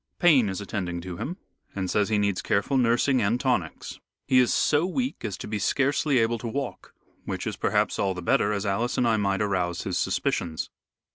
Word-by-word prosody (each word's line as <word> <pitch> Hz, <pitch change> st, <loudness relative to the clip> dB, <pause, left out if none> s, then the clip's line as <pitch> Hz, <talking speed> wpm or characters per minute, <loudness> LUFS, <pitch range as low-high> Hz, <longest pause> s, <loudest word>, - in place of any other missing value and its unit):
Payne 140 Hz, -, +5 dB
is 95 Hz, -, -3 dB
attending 90 Hz, -4 st, -4 dB
to 90 Hz, -1 st, -7 dB
him 175 Hz, -, -4 dB, 0.4 s
and 95 Hz, -2 st, -2 dB
says 105 Hz, +2 st, +1 dB
he 110 Hz, -, +2 dB
needs 100 Hz, -2 st, 0 dB
careful 100 Hz, +7 st, 0 dB
nursing 125 Hz, +1 st, +3 dB
and 110 Hz, +4 st, +1 dB
tonics. 125 Hz, -, -2 dB, 0.3 s
He 130 Hz, -, +4 dB
is 125 Hz, -, +4 dB
so 150 Hz, +1 st, +3 dB
weak 250 Hz, +8 st, -2 dB
as 105 Hz, -4 st, -3 dB
to -, -, -7 dB
be 105 Hz, -1 st, -2 dB
scarcely 140 Hz, +4 st, +1 dB
able 115 Hz, 0 st, +1 dB
to 115 Hz, 0 st, -5 dB
talk, 135 Hz, 0 st, -5 dB, 0.3 s
which -, -, -4 dB
is -, -, -3 dB
perhaps -, -, 0 dB
all 95 Hz, -2 st, 0 dB
the 90 Hz, -, -6 dB
better, 100 Hz, +4 st, +2 dB
as 100 Hz, 0 st, -2 dB
Alice 110 Hz, +5 st, -1 dB
and 125 Hz, -, +2 dB
I 110 Hz, -1 st, +3 dB
might 100 Hz, -1 st, +1 dB
arouse 90 Hz, -3 st, -1 dB
his 90 Hz, -2 st, -2 dB
suspicions. 80 Hz, -2 st, -1 dB
105 Hz, 205 wpm, -26 LUFS, 95-130 Hz, 0.4 s, Payne